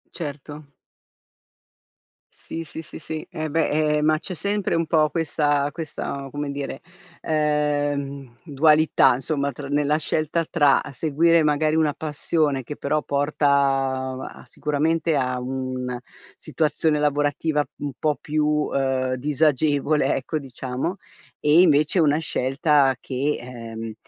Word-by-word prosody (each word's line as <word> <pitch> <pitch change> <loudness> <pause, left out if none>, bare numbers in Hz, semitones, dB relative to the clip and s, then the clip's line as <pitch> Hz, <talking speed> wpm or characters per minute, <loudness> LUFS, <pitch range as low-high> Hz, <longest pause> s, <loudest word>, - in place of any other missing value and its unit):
Certo. 145 -2 -7 1.7
Sì, 165 - -6
sì, 160 0 -7
sì, - - -10
sì, 155 0 -6
eh 155 0 -4
beh, 150 -1 +1
eh - - 0
ma 155 +1 +3
c'è 185 - -6
sempre 200 +3 -1
un 165 0 +1
po' 155 -2 +3
questa 145 -3 0
questa, 140 -3 -5
come 145 0 -4
dire, 140 -1 -5 0.4
ehm, 145 -4 -1
dualità 155 -2 +4
insomma 140 +2 -2
tr 140 0 -8
nella 145 +1 +2
scelta 155 +1 -1
tra 145 -4 +4
seguire 160 +4 +3
magari 155 +1 +2
una 155 -2 +2
passione 150 -2 -1
che 145 +5 -7
però 150 +2 -1
porta 145 +1 0 0.9
a - - -14
sicuramente, 160 +2 0
a 130 -2 0
un 130 -1 -4 0.4
situazione 155 0 0
lavorativa 145 +1 +1
un 145 -2 -5
po' 150 -3 +1
più, 150 0 -1
uhm, 135 -4 0
disagevole, 145 +1 +1
ecco 145 +4 -3
diciamo, 130 +5 -4 0.4
e 150 +3 +5
invece 155 +1 +4
una 150 -2 +4
scelta 140 -2 +2
che, 140 +3 -2
ehm, 115 -2 -7
150 Hz, 125 wpm, -23 LUFS, 140-155 Hz, 1.7 s, e